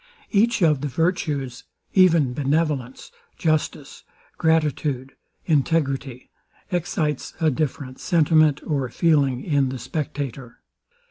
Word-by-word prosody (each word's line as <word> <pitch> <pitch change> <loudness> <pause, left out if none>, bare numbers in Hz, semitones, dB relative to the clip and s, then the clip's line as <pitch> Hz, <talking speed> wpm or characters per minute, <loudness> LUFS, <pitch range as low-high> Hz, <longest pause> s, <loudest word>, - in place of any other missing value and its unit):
Each 220 -1 +2
of 150 -5 +3
the 145 - -1
virtues, 145 -5 -1 0.3
even 165 -9 +4
benevolence, 140 -2 -1 0.3
justice, 155 -3 -2 0.3
gratitude, 150 -4 0 0.3
integrity, 140 -4 0 0.4
excites 160 -5 -2
a 160 -2 +3
different 135 -2 -3
sentiment 155 -4 +3
or 140 -5 -1
feeling 140 -2 +2
in 140 -4 +1
the 130 - -4
spectator. 135 -2 -5
150 Hz, 95 wpm, -23 LUFS, 135-160 Hz, 0.4 s, even